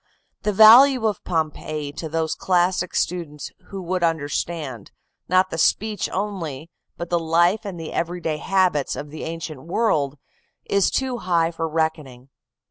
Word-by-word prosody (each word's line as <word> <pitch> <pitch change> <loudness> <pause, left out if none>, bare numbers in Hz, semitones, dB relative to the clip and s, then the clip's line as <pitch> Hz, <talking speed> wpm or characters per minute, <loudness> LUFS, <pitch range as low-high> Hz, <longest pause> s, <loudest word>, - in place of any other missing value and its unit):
"The 210 - 0
value 230 +4 +7
of 210 -3 -1
Pompeii 155 -3 -3
to 155 +2 -6
those 160 0 -1
classic 180 0 0
students 165 -5 -3 0.2
who 195 -2 -7
would 180 +1 -2
understand, 150 - -2 0.4
not 185 +1 +3
the 165 - -3
speech 210 +3 +1
only, 170 -7 -4 0.3
but 170 0 -6
the 175 - +2
life 170 +6 +2
and 190 -4 -6
the 160 - -7
every 175 +1 -2
day 160 -2 -2
habits, 180 -6 +1
of 145 0 -7
the 155 - -7
ancient 160 -4 -6
world, 155 - 0 0.5
is 200 -1 +2
too 260 -2 -1
high 170 -3 +1
for 165 -1 -3
reckoning. 155 -5 -3
170 Hz, 150 wpm, -22 LUFS, 155-185 Hz, 0.5 s, value